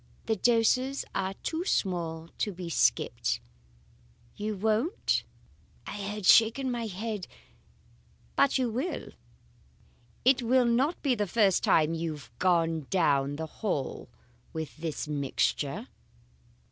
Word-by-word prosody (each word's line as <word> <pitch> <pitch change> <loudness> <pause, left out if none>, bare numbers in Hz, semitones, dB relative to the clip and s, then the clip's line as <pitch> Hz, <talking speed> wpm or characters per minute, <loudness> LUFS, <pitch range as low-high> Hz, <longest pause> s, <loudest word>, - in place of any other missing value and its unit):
The 220 - +1
doses 245 +5 +2
are 195 0 -2
too 325 +1 -2
small 170 - -1
to 210 - 0
be 175 -2 -6
skipped. - - +1 1.0
You 210 +1 -3
won't?' 220 - +1 0.6
I - - -6
had 205 0 -4
shaken 230 +6 +5
my 235 -2 -2
head 210 0 -4 1.1
'But 280 - +4
you 255 -2 +1
will! 265 +11 -3 1.2
It 260 0 +5
will 250 +1 +3
not 260 +8 +2
be 275 -4 +3
the 210 -4 -1
first 200 -2 +3
time 155 0 +4
you 165 -1 -2
have 145 -5 -12
gone 165 -5 +2
down 145 -6 +2
the 160 +2 -4
hall 160 -4 -3 0.4
with 160 -1 -5
this 160 -1 -4
mixture. 145 - -1
205 Hz, 120 wpm, -29 LUFS, 165-235 Hz, 1.2 s, shaken